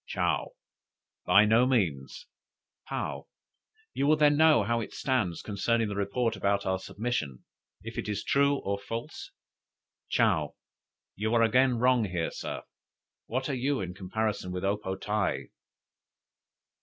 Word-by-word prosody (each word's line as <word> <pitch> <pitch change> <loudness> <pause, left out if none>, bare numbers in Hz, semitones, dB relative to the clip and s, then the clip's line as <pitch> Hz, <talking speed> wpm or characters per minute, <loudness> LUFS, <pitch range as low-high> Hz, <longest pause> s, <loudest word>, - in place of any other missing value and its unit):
'" - - -56
"Chow. - - -1 0.7
'By 100 +4 +7
no 115 +4 +4
means.'" 85 - -1 0.6
"Paou. - - -4 0.7
'You 140 - 0
will 155 - +6
then 150 -1 +4
know 155 -6 +5
how 115 +3 0
it 110 - -6
stands 115 -11 -1
concerning 110 +2 0
the 100 - -4
report 105 +4 0
about 100 0 0
our 95 0 0
submission, 95 - -4 0.4
if - - -6
it - - -4
is 105 -1 -2
true 140 +1 +3
or 100 0 -1
false?'" 115 +3 -6 0.8
"Chow. - - +1 0.6
'You 110 +3 -1
are 115 - +5
again 125 +2 +3
wrong 125 -1 +3
here, 90 -4 -2
Sir. - - -6 0.6
What 130 +3 -2
are 140 - -2
you 135 +2 0
in 90 -2 -4
comparison 100 0 -3
with 90 0 -4
O 100 +1 +2
po 95 -2 -5
tae?'" 105 +1 -2
110 Hz, 145 wpm, -29 LUFS, 100-125 Hz, 0.8 s, By